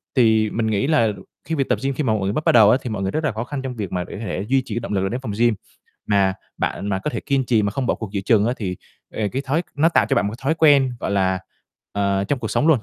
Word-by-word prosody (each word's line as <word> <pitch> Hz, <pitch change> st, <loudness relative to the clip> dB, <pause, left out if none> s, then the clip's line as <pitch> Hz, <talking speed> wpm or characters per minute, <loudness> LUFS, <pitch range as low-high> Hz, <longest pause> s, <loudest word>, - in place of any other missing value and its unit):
Thì 110 Hz, -3 st, +4 dB
mình 110 Hz, +1 st, -1 dB
nghĩ 110 Hz, +5 st, 0 dB
là 155 Hz, -8 st, +3 dB, 0.4 s
khi 165 Hz, -, -1 dB
việc 135 Hz, -3 st, -1 dB
tập -, -, +1 dB
gym 135 Hz, 0 st, 0 dB
khi 150 Hz, -, -2 dB
mà 115 Hz, -, +2 dB
một 110 Hz, -, 0 dB
người 100 Hz, -, 0 dB
bắt 155 Hz, -, -2 dB
bắt -, -, +5 dB
đầu 110 Hz, -3 st, +7 dB
á, -, -, +4 dB
thì 125 Hz, -, -5 dB
mọi 105 Hz, -3 st, -3 dB
người 95 Hz, -, -1 dB
rất 155 Hz, -, -2 dB
là 145 Hz, -, +1 dB
khó 110 Hz, +2 st, -4 dB
khăn 135 Hz, +2 st, -5 dB
trong 130 Hz, -2 st, -5 dB
việc 100 Hz, -5 st, -5 dB
mà 90 Hz, -1 st, -1 dB
để -, -, -10 dB
có -, -, -7 dB
thể 95 Hz, +1 st, -3 dB
duy 135 Hz, 0 st, +3 dB
trì 110 Hz, -, -5 dB
cái 120 Hz, -, 0 dB
động 115 Hz, -3 st, -5 dB
lực 95 Hz, 0 st, 0 dB
đến 125 Hz, +2 st, -3 dB
phòng 115 Hz, -6 st, -4 dB
gym. 120 Hz, -2 st, +4 dB, 0.5 s
Mà 100 Hz, -2 st, +2 dB, 0.2 s
bạn 100 Hz, -, -2 dB
mà 95 Hz, -2 st, 0 dB
có 130 Hz, -, -3 dB
thể -, -, -4 dB
kiên 140 Hz, -2 st, 0 dB
trì 115 Hz, -3 st, +3 dB
mà 100 Hz, -, 0 dB
không 130 Hz, +4 st, -2 dB
bỏ -, -, +2 dB
cuộc 110 Hz, -3 st, -7 dB
giữa 100 Hz, -, -1 dB
chừng 105 Hz, +1 st, +3 dB
á, 120 Hz, -, +1 dB
thì, 95 Hz, -5 st, -4 dB, 0.4 s
ề, 105 Hz, -2 st, -1 dB
cái 135 Hz, +5 st, -3 dB
thói 145 Hz, +6 st, 0 dB
nó 155 Hz, +3 st, +4 dB
tạo 170 Hz, -, +3 dB
cho -, -, +1 dB
bạn 100 Hz, -, +2 dB
một 105 Hz, -, -3 dB
cái -, -, -17 dB
thói 155 Hz, +4 st, +2 dB
quen, 145 Hz, -5 st, +4 dB
gọi -, -, -2 dB
là, 95 Hz, -2 st, +1 dB, 0.5 s
ờ, 100 Hz, -1 st, 0 dB
trong 135 Hz, +7 st, -1 dB
cuộc 110 Hz, -3 st, -4 dB
sống 150 Hz, -, +1 dB
luôn, 160 Hz, -5 st, +5 dB
115 Hz, 325 wpm, -21 LUFS, 100-135 Hz, 0.5 s, đầu